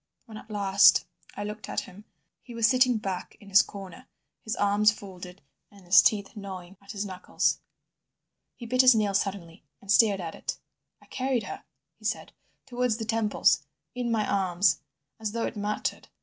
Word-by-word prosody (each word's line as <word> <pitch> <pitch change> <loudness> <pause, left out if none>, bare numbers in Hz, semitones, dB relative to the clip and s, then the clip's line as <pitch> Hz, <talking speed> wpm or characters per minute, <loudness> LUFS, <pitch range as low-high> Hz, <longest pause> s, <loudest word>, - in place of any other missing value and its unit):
When 225 -3 -12
at 215 - -13
last 200 -1 +5 0.3
I 205 - -3
looked 210 +1 -7
at - - -1
him 200 +3 -13 0.4
he 240 - -11
was 230 -1 +2
sitting 255 -1 +4
back 190 -4 -5
in 200 - -15
his 200 +1 +7
corner, 195 -5 -10 0.4
his 220 - -3
arms 205 +1 +3
folded, 185 -4 -11 0.3
and 200 -2 -18
his 185 +2 +7
teeth 205 -1 +1
gnawing 190 -3 -8
at 200 +2 -10
his 205 0 -3
knuckles. 185 -2 -1 1.0
He 240 - -9
bit 255 +2 +3
his 255 -2 +7
nail 210 -2 +1
suddenly, 190 -4 -3 0.2
and 200 - -5
stared 205 -2 +5
at 165 -3 -5
it. - - -5 0.5
"I - - -19
carried 260 -2 -1
her," - - -8 0.3
he - - -15
said, - - -2 0.3
"towards 250 -3 -1
the 225 - -4
temples, 220 -1 +2 0.3
in 245 -1 -3
my 215 -2 0
arms—as 190 0 -1
though 230 0 -1
it - - -5
mattered. 210 0 -3
205 Hz, 175 wpm, -27 LUFS, 195-225 Hz, 1.0 s, his